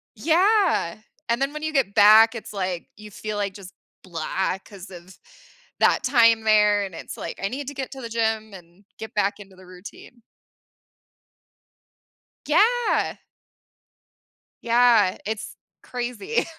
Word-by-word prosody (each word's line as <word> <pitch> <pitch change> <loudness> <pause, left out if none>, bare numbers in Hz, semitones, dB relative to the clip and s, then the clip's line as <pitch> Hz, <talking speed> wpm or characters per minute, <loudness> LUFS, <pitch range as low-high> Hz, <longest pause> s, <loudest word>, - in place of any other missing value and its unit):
Yeah. 360 - +2 0.3
And 235 +3 0
then 275 +2 -1
when 305 - -7
you 315 0 -3
get 250 -8 +1
back, 220 +2 +7
it's, 220 -2 -8
like, 185 -3 -4
you 210 0 -12
feel, 210 +1 -6
like, 200 -2 -2
just 195 -2 -12 0.3
blah 185 +2 -3
'cause 195 -3 -12
of 180 +1 -13 0.6
that - - +3
time 230 -4 +4
there 210 -1 +3
and 190 -4 -7
it's, - - -9
like, 165 - -7
I 195 - 0
need 270 +3 -6
to 285 - -5
get 265 -1 -6
to 265 -1 -9
the 230 - -7
gym 220 -2 -2
and 180 +2 -15
get 220 0 -9
back 205 0 0
into 195 -2 -14
the 185 0 -16
routine. 185 +6 -13 2.3
Yeah. 460 +10 +2 1.5
Yeah, 235 -5 +3
it's 215 0 -5 0.3
crazy. 250 - -3
220 Hz, 140 wpm, -23 LUFS, 195-250 Hz, 2.3 s, back